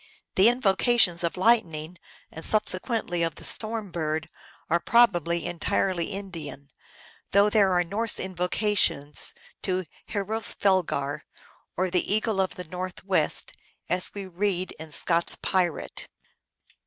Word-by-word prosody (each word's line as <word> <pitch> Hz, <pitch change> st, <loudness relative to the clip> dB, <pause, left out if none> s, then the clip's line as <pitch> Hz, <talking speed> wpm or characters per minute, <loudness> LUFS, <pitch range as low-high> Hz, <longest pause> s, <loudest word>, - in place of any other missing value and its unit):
The 195 Hz, +5 st, +6 dB
invocations 225 Hz, -5 st, +3 dB
of 170 Hz, -, -1 dB
Lightning, 180 Hz, -6 st, +2 dB, 0.3 s
and 160 Hz, -, -8 dB
subsequently 210 Hz, -3 st, 0 dB
of 165 Hz, -1 st, 0 dB
the -, -, -11 dB
Storm 215 Hz, -3 st, -2 dB
Bird 160 Hz, -1 st, -2 dB, 0.4 s
are 170 Hz, -, +2 dB
probably 175 Hz, -7 st, +3 dB
en 175 Hz, -1 st, -4 dB
tirely 180 Hz, -2 st, 0 dB
Indian, 165 Hz, -8 st, -7 dB, 0.6 s
though 200 Hz, +1 st, +5 dB
there 205 Hz, -3 st, +4 dB
are 175 Hz, 0 st, +3 dB
Norse 210 Hz, +6 st, +1 dB
invocations 180 Hz, -5 st, 0 dB, 0.3 s
to 185 Hz, -1 st, -1 dB, 0.3 s
Hroesvelgar, 195 Hz, -8 st, 0 dB, 0.6 s
or 185 Hz, 0 st, 0 dB
the 180 Hz, +1 st, 0 dB
Eagle 215 Hz, -1 st, +1 dB
of 190 Hz, -, -2 dB
the 180 Hz, -, -6 dB
Northwest, 180 Hz, -1 st, -1 dB, 0.4 s
as 180 Hz, +1 st, +1 dB
we 200 Hz, -1 st, -5 dB
read 185 Hz, 0 st, -1 dB
in 160 Hz, 0 st, -8 dB
Scott 170 Hz, +3 st, +1 dB
s -, -, -1 dB
Pirate. 180 Hz, -4 st, -1 dB
185 Hz, 125 wpm, -26 LUFS, 170-205 Hz, 0.6 s, The